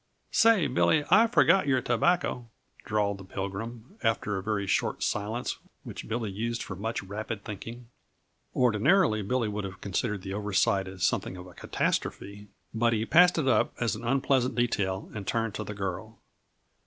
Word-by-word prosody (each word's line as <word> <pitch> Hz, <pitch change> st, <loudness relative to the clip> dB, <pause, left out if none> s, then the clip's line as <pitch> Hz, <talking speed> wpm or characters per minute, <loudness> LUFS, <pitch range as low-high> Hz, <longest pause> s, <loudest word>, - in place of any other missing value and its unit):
"Say, 225 Hz, -7 st, +5 dB
Billy, 145 Hz, +3 st, +2 dB
I 220 Hz, +5 st, +7 dB
forgot 195 Hz, -7 st, +4 dB
your 130 Hz, -2 st, +3 dB
tobacco," 125 Hz, -1 st, 0 dB, 0.4 s
drawled 105 Hz, -2 st, 0 dB
the -, -, -9 dB
Pilgrim, 110 Hz, -, -6 dB
after 110 Hz, -2 st, 0 dB
a 95 Hz, -, -2 dB
very 105 Hz, 0 st, -1 dB
short 95 Hz, -, 0 dB
silence 110 Hz, +4 st, -2 dB, 0.2 s
which -, -, -8 dB
Billy 115 Hz, -2 st, -2 dB
used 115 Hz, +4 st, -3 dB
for 95 Hz, -, -6 dB
much 110 Hz, +3 st, -3 dB
rapid 105 Hz, +2 st, -5 dB
thinking. 115 Hz, +3 st, -8 dB, 0.7 s
Ordinarily, 125 Hz, -, +3 dB
Billy 115 Hz, +3 st, 0 dB
would 105 Hz, 0 st, -3 dB
have 95 Hz, -1 st, -7 dB
considered 100 Hz, 0 st, -2 dB
the 95 Hz, -, -5 dB
over 105 Hz, 0 st, -4 dB
sight 95 Hz, -2 st, +2 dB
as 95 Hz, -1 st, -7 dB
something 95 Hz, -, 0 dB
of 90 Hz, -, -9 dB
a 90 Hz, -, -13 dB
catastrophe, 100 Hz, +3 st, -3 dB, 0.3 s
but 115 Hz, +1 st, +2 dB
he 110 Hz, 0 st, 0 dB
passed 175 Hz, +7 st, +5 dB
it 150 Hz, -4 st, 0 dB
up 130 Hz, -, +3 dB
as 120 Hz, -2 st, 0 dB
an 110 Hz, -, -8 dB
unpleasant 130 Hz, 0 st, +1 dB
detail 100 Hz, -6 st, -1 dB
and 105 Hz, -3 st, -6 dB
turned 115 Hz, -2 st, -1 dB
to 110 Hz, -, -4 dB
the 105 Hz, 0 st, -7 dB
girl. 100 Hz, +3 st, -5 dB
110 Hz, 170 wpm, -28 LUFS, 100-125 Hz, 0.7 s, I